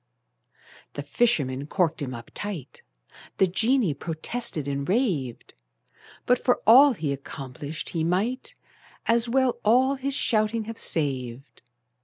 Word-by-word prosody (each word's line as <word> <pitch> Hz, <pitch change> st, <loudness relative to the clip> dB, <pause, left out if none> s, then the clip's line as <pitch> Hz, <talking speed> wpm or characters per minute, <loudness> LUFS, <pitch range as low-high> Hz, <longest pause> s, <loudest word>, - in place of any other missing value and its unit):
The 145 Hz, -, -5 dB
fisherman 145 Hz, -, 0 dB
corked 170 Hz, -2 st, 0 dB
him 135 Hz, -3 st, -3 dB
up 115 Hz, 0 st, -11 dB
tight: 185 Hz, -10 st, -6 dB, 0.6 s
The 190 Hz, -, +5 dB
genie 220 Hz, -, +1 dB
protested 160 Hz, -, -3 dB
and 140 Hz, +1 st, -3 dB
raved, 180 Hz, -, -1 dB, 0.7 s
But 250 Hz, 0 st, +2 dB
for 250 Hz, -, +2 dB
all 265 Hz, +5 st, +8 dB
he 150 Hz, -9 st, -2 dB
accomplished, 140 Hz, +2 st, -7 dB
he 165 Hz, -2 st, -2 dB
might 230 Hz, -, -1 dB, 0.5 s
As 235 Hz, +1 st, +2 dB
well 260 Hz, 0 st, +1 dB
all 255 Hz, +5 st, +4 dB
his 270 Hz, +1 st, -3 dB
shouting 220 Hz, -3 st, +1 dB
have 225 Hz, +1 st, -7 dB
saved. 135 Hz, -4 st, -1 dB
185 Hz, 125 wpm, -25 LUFS, -, 0.7 s, all